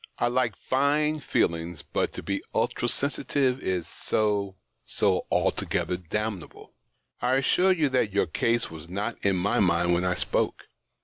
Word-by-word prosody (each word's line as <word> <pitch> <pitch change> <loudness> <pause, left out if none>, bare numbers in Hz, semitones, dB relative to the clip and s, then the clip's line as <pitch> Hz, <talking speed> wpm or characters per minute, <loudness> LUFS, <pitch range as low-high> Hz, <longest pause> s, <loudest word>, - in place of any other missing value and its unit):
I 120 - +1
like 125 -4 +1
fine 145 +6 +1
feelings, 85 - -1
but - - -1
to - - -7
be - - -2
ultra - - 0
sensitive 135 -2 0
is 90 -3 -2
so— 100 -3 -1 0.3
so - - 0
altogether 90 - 0
damnable. 95 +2 -5 0.5
I 125 +1 +2
assure 180 +8 +3
you 160 -5 +3
tliat 130 -6 +1
your 100 - +2
case 115 +7 0
was 80 +1 -9
not 105 +5 -4
in 100 -1 +3
my 95 +3 +1
mind 85 -2 +3
when 85 +1 +1
I 90 -1 +1
spoke. - - -1
105 Hz, 150 wpm, -27 LUFS, 90-130 Hz, 0.5 s, assure